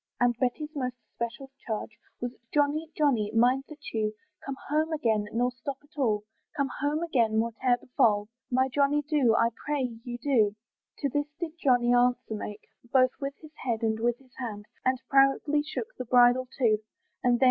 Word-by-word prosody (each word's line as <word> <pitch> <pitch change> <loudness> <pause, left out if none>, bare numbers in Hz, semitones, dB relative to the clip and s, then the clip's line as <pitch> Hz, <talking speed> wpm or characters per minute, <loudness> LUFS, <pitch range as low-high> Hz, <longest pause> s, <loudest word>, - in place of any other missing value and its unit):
And 245 -1 +3
Betty's 285 +4 -1
most 255 -3 -2 0.2
especial 235 +3 -5 0.2
charge, 220 -1 -3 0.3
Was, 245 0 -2 0.2
"Johnny! 295 +2 +1
Johnny! 250 -9 +2
mind 250 +4 +4
that 305 -1 -9
you 215 -1 0 0.3
"Come 275 -1 -5
home 310 +2 +1
again, 225 -9 +1
nor 245 +2 +1
stop 255 +2 -5
at 300 +2 -26
all, 220 -8 +1 0.3
"Come 280 -1 +1
home 295 +3 0
again, 240 -10 +2
whate'er 235 +2 +2
befal, 215 -5 +2 0.2
"My 260 +1 +3
Johnny 285 +2 +2
do, 285 -6 +3
I 230 - +4
pray 260 -6 -2
you 240 -1 -5
do." 235 -6 +2 0.5
To 280 - +1
this 290 +2 -1
did 340 -3 -3
Johnny 245 -2 +4
answer 245 -2 +2
make, 210 0 -5 0.3
Both 255 -1 +5
with 275 -1 -3
his 310 -1 -13
head, 230 -3 -1
and 220 -1 +1
with 240 +1 +1
his 260 -1 -24
hand, 210 -5 -5 0.2
And 255 0 +2
proudly 275 +2 +4
shook 440 +10 -5
the - - -3
bridle 245 +1 +5
too, 225 -5 +3 0.4
And 245 - +4
then! 240 - +2
255 Hz, 180 wpm, -28 LUFS, 235-285 Hz, 0.5 s, Both